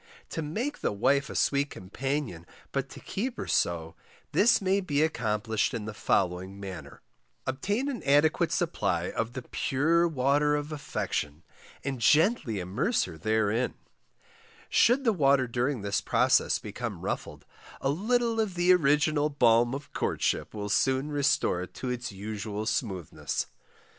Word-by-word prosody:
To 165 - -3
MAKE 220 - -3
the - - 0
wife 140 +7 +2
a - - -7
sweet 140 0 +2
companion, 120 - -4 0.2
but 135 0 -2
to - - -10
keep 245 +5 -4
her - - -4
so, 80 -1 0 0.4
this 230 - +5
may 195 0 +1
be 150 -5 +1
accomplished 110 -5 0
in 110 -3 -4
the 110 - -5
following 95 -1 0
manner: 95 -2 -8 0.4
Obtain 205 - -1
an 270 -5 -3
adequate 145 +3 +3
supply - - 0
of 115 +1 -2
the 130 - -5
pure 160 +8 +1
water 145 0 +2
of 145 +1 -3
affection, 80 - -3 0.4
and 135 -3 -3
gently 150 - +3
immerse 100 - 0
her 90 - -6
therein: 110 +6 0 0.9
should 250 +4 +4
the 230 -4 +3
water 140 -6 +3
during 120 0 -1
this 100 - 0
process - - +3
become - - -6
ruffled, - - -4 0.3
a 135 - 0
little 230 +7 +1
of 210 -5 0
the 175 +1 +5
original 150 -2 +3
balm 120 -3 +3
of 140 - -9
courtship - - -1
will 105 -1 -4
soon 135 +6 +1
restore 140 -10 +1
it 90 - -8
to 130 - -4
its 125 -2 -3
usual 105 +1 -5
smoothness. 95 - -2
135 Hz, 150 wpm, -28 LUFS, 105-155 Hz, 0.9 s, this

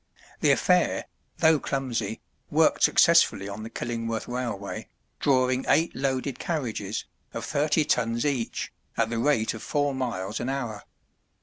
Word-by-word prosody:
The - - +3
affair, - - +3 0.3
though 160 -1 +5
clumsy, 120 -7 -2 0.3
worked - - +3
successfully 95 - +5
on 100 +1 -6
the 110 - -6
Killingworth 115 -2 -3
railway, 120 -5 -4 0.3
drawing 130 -1 +2
eight 165 +2 +3
loaded 135 0 -1
carriages, 115 - -3 0.3
of - - -3
thirty 150 +1 +1
tons 115 -1 +1
each, 130 -6 -2 0.2
at 110 - +1
the 115 - -1
rate 120 -4 +2
of 110 - -8
four 145 -1 0
miles 115 -6 -3
an 120 - -2
hour. 120 -6 -4
125 Hz, 135 wpm, -26 LUFS, 115-140 Hz, 0.3 s, though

